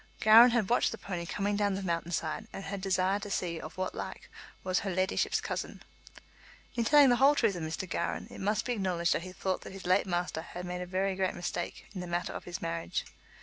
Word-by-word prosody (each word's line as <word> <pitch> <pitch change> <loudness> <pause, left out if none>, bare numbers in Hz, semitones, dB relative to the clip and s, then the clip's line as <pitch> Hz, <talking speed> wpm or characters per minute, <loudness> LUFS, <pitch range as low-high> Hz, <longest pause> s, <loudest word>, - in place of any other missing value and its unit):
Gowran 225 +3 +9
had 235 -4 +1
watched 245 - +3
the 225 - -5
pony 175 -5 -5
coming 205 +3 -1
down 205 -1 +1
the 195 - -4
mountain 170 -1 -2
side, 165 +5 -2
and 195 - -7
had 195 0 -5
desired 190 +1 +1
to 205 - -6
see 170 -4 -2
of 160 +3 -9
what 185 0 -2
like - - -7 0.3
was 185 -1 +1
"her 200 - -3
leddyship's" 185 +1 +1
cousin. - - -5 0.9
In 235 - 0
telling 285 +3 +7
the 245 - +4
whole 275 +3 +6
truth 225 -8 +2
of 175 - -5
Mr. 160 +4 -4
Gowran, 170 - -2
it - - -9
must 205 +2 0
be 245 - 0
acknowledged 180 -5 +1
that - - -1
he 185 +1 -8
thought 185 0 -2
that - - -9
his 195 -1 -9
late 185 +2 +3
master 175 -2 -1
had 180 +2 -7
made 180 0 -4
a 180 - -5
very 190 +1 0
great 190 0 0
mistake 175 0 -4
in 185 - -5
the 180 - -6
matter 175 +1 -2
of - - -7
his 175 -1 -6
marriage. 165 0 -2
185 Hz, 235 wpm, -31 LUFS, 175-205 Hz, 0.9 s, Gowran